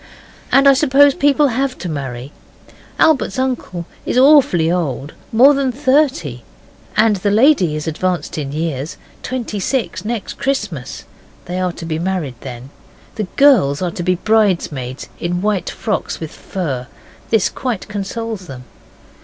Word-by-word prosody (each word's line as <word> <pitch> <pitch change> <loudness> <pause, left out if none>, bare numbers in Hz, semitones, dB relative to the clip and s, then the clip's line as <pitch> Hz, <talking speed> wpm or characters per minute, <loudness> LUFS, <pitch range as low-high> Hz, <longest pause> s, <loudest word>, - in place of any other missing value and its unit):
And 275 +1 +5
I 275 - +8
suppose 280 0 +5
people 285 +1 +3
have 260 +2 -1
to 185 - -6
marry. 135 -4 -5 0.7
Albert's 310 -4 +2
uncle 250 -10 -2 0.2
is - - -2
awfully 255 - +5
old 150 -5 -2 0.2
more 260 +6 +6
than 275 -2 0
thirty, 260 - +1 0.6
and 215 -1 +4
the 205 +2 0
lady 210 - +4
is 155 - -4
advanced 180 +3 -2
in 140 -2 -4
years 155 0 -3 0.2
twenty 240 -5 -4
six 250 +5 -2
next 225 -1 -4
Christmas. 210 - -3 0.4
They 180 +1 -4
are 180 -1 0
to 165 - -8
be 160 -1 -2
married 170 -9 -3
then. 130 +1 -9 0.4
The 215 - -3
girls 225 - +5
are 175 - -1
to 175 - -5
be 185 +1 +1
bridesmaids 175 - 0
in 175 +2 -2
white 210 -3 0
frocks 215 -3 -3
with 160 -1 -6
fur. 135 -10 -4 0.4
This 225 -4 +3
quite 245 -7 -4
consoles 210 0 -5
them. 130 -3 -9
190 Hz, 145 wpm, -18 LUFS, 160-255 Hz, 0.7 s, I